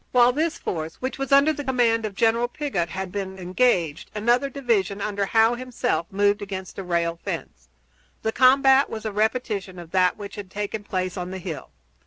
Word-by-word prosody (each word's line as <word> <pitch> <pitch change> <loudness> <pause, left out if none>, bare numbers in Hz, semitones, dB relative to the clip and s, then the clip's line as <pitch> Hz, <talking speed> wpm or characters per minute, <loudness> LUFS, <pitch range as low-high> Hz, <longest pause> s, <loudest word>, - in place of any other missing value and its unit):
While 245 0 +6
this 320 +5 -1
force, 160 -1 -4
which 260 +1 -5
was 275 0 -3
under 280 +3 +6
the 290 - -5
command 235 -4 +2
of 200 - -10
General 230 +3 +2
Pigott, 240 - -2
had 190 +1 -5
been 190 -1 -4
engaged, 180 -4 +1
another 240 +6 +2
division 230 -8 0
under 200 -1 -1
Howe 225 +2 +4
himself 245 -7 -2
moved 205 +1 +2
against 190 -2 -6
the 195 - -5
rail 170 -1 -1
fence. - - -6 0.5
The 220 - +1
combat 265 +2 +5
was 220 0 -6
a 215 - -1
repetition 210 -3 -1
of 170 -2 -10
that 185 -1 +3
which 205 0 -8
had 200 -2 -7
taken 205 +2 -4
place 185 -1 -3
on 180 0 -4
the 190 - -5
hill. 175 -4 -6
205 Hz, 190 wpm, -24 LUFS, 185-245 Hz, 0.5 s, While